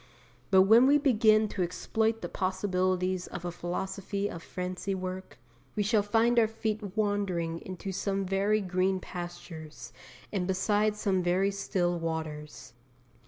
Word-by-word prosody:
But 190 -1 +7
when 225 +6 +7
we 285 +1 +6
begin 220 -6 +4
to 195 - -3
exploit 220 +5 0
the - - -1
possibilities 185 -1 0
of 175 - -7
a 175 - -2
Philosophy 190 +3 -3
of 170 - -7
Fancy 185 +2 -4
work, 185 0 -6 0.4
we 210 - +1
shall 210 +1 +3
find 230 +3 +3
our 225 - +4
feet 215 -2 -4
wandering 190 -6 0
into 185 +2 -6
some 195 +1 -1
very 200 +3 +1
green 185 0 0
pastures 165 -8 -8 0.4
and 185 -3 -1
beside 205 +3 +1
some 195 -3 +1
very 185 +3 +2
still 175 -3 -1
waters. 155 -5 -5
190 Hz, 140 wpm, -29 LUFS, 180-210 Hz, 0.4 s, But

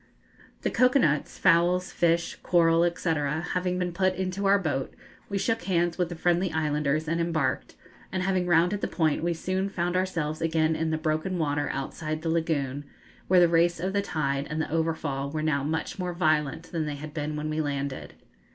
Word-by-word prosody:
The - - 0
cocoa 255 +2 +4
nuts, 150 - +1
fowls, 180 +2 +3
fish, 170 -1 +1
coral, 170 0 +4
&c., - - -6
having 165 +4 -1
been 180 -1 -2
put 185 +1 +1
into 190 +1 -2
our 200 +1 +6
boat, 150 -8 -2 0.3
we 200 - -1
shook 225 +4 0
hands 175 -2 0
with 180 - +1
the 175 - -5
friendly 175 +2 +1
islanders 150 -1 0
and 165 +2 0
embarked, 160 -6 -1 0.4
and 185 -1 -1
having 185 -1 0
rounded 175 +4 +3
the - - 0
point 155 -4 0
we 170 0 0
soon 185 +3 -2
found 175 -1 -2
ourselves 165 -5 -1
again 160 -1 +1
in 160 0 -1
the 160 - 0
broken 155 +4 -1
water 145 -2 0
outside 155 +3 -4
the 165 - -1
lagoon, 145 -4 -1 0.4
where 185 0 +5
the 175 - +6
race 170 0 +2
of 185 +3 -2
the 200 - +2
tide 140 -6 -2
and 155 +1 -3
the 160 - -2
overfall 160 -4 -1
were 155 +1 -3
now 145 -3 +1
much 160 +5 -3
more 180 -1 -2
violent 155 -2 0
than 160 -3 -2
they 145 - -3
had 150 +1 -8
been 150 -1 -3
when 150 +1 -3
we 155 +1 0
landed. 140 -2 -4
165 Hz, 195 wpm, -27 LUFS, 155-180 Hz, 0.4 s, our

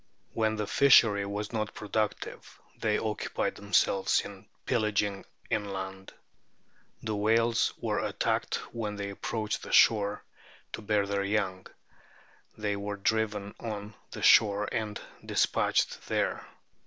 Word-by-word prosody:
When 110 -1 +1
the 105 -1 -2
fishery 105 -5 +5
was 105 +2 -4
not 110 -2 -2
productive 105 0 -3 0.2
they 105 -2 0
occupied 110 -1 -2
themselves 100 -1 +2
in 100 -1 -11 0.2
pillaging 105 -4 0 0.3
inland. 95 -2 -4 0.9
The 110 -1 -2
whales 115 +2 +2
were - - -1
attacked - - -1 0.2
when 110 -3 -3
they 100 -1 -4
approached 110 +1 -3
the - - -8
shore 105 -2 +4 0.5
to - - -5
bear 105 -1 +1
their 100 0 -1
young; 100 -2 -1 0.9
they 105 -1 -1
were 100 0 -4
driven 105 -1 -1
on 105 -2 -5
to - - -24
the - - -7
shore 105 -1 +5
and 110 -3 -3 0.2
despatched - - +1
there. - - -1
105 Hz, 125 wpm, -29 LUFS, 100-110 Hz, 0.9 s, fishery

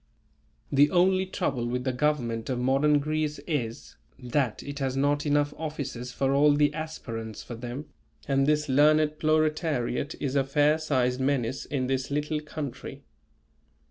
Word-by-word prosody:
The 145 +1 +5
only 185 +1 +3
trouble 135 -11 -2
with 125 +1 -2
the 130 -1 -1
government 125 -5 -1
of 130 - -1
modern 135 +4 +3
Greece 150 +1 -1
is, 120 -8 -4 0.2
that 125 -1 -1
it 140 0 -6
has 135 -1 -1
not 145 +2 +1
enough 145 0 +2
offices 140 -6 -5
for 135 +2 0
all 145 +1 +5
the 145 0 +3
aspirants 115 -9 -6
for - - -8
them, 120 +5 -6 0.4
and 135 0 +2
this 150 0 +2
learned 150 +2 +3
proletariat 155 -3 0
is 140 -1 -2
a 140 - +3
fair 145 +3 +2
sized 130 -5 0
menace 130 -2 0
in 135 -3 -2
this 130 0 -1
little 150 +2 -1
country. 150 -3 -7
145 Hz, 150 wpm, -27 LUFS, 130-150 Hz, 0.4 s, The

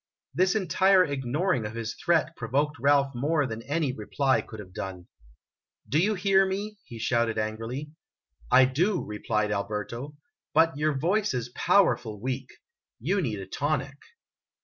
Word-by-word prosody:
This 185 +3 +2
entire 190 0 +4
ignoring 140 - -1
of 105 +1 -5
his 115 0 -3
threat 165 -1 +1
provoked 140 +5 -1
Ralph 140 +1 +3
more 145 +4 +1
than 115 -2 -5
any 145 +2 -1
reply 130 +5 +1
could 110 - -11
have 95 -3 -10
done. 90 -1 -6 0.8
"Do 150 - +2
you 210 +5 +2
hear 195 +1 +4
me? 200 +2 -3
"he 115 - -9
shouted 115 0 0
angrily. 115 +7 -3 0.3
" 65 -3 -28
I 130 - +8
do," 175 +9 0
replied 105 0 -1
Alberto; 105 +7 -4 0.4
"but 165 -1 +4
your 150 -1 0
voice 190 +4 +1
is 125 -1 -3
powerful 120 - +2
weak. 130 +4 -3 0.5
You 190 - 0
need 115 -10 -2
a - - -6
tonic." 145 +5 -2
135 Hz, 150 wpm, -27 LUFS, 115-165 Hz, 0.8 s, I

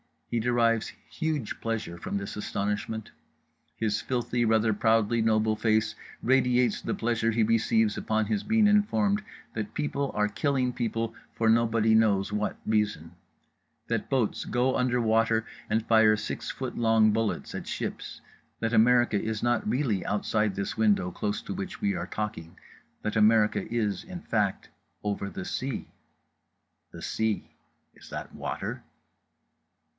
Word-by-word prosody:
He 120 - +1
derives 115 -1 +1 0.2
huge 155 -8 -2
pleasure 110 -7 -3
from 95 - -3
this 100 0 -5
astonishment. 105 +1 -3 0.6
His 110 -2 -1
filthy 120 -1 -1
rather 110 0 +3
proudly 110 +1 +2
noble 110 -1 +2
face 110 -1 +2 0.3
radiates 125 -2 +3
the - - -2
pleasure 115 -1 0
he 115 0 +2
receives 110 -1 +2
upon 110 -1 0 0.2
being 220 0 +4
informed 210 0 +3 0.3
that 110 -2 -4
people 140 -2 -1
are 105 0 +2
killing 130 +2 0
people 115 -2 -2 0.2
for 115 -1 +2
nobody 115 -1 +3
knows 105 -3 +3
what 105 0 -1
reason, 105 -7 0 0.8
that - - -1
boats 125 -6 0
go 125 +2 +1
under 125 -1 +1
water 115 0 +2 0.2
and 110 +1 +1
fire 110 -1 +5
six 110 0 -4
foot 130 -2 -5
long 110 -2 +4
bullets 110 0 -1
at - - -6
ships, - - -5 0.4
that 115 0 -1
America 120 -2 +4
is 110 -1 -3
not 120 -2 +1
really 115 -6 0
outside 105 -1 0
this 100 0 -3
window 100 -5 +2
close 105 +3 -3
to - - -5
which 190 0 -6
we 205 -1 +1
are 175 - -4
talking, 90 -6 -5 0.5
that 105 0 -1
America 110 0 +3
is, 110 -4 -1
in 180 -1 -8
fact, 105 - -1 0.3
over 100 -1 -2
the 90 - -6
sea. 130 -1 -3 1.0
The - - -10
sea: 110 -2 -1 0.4
is - - -15
that - - -7
water? - - -4
110 Hz, 140 wpm, -28 LUFS, 105-120 Hz, 1.0 s, fire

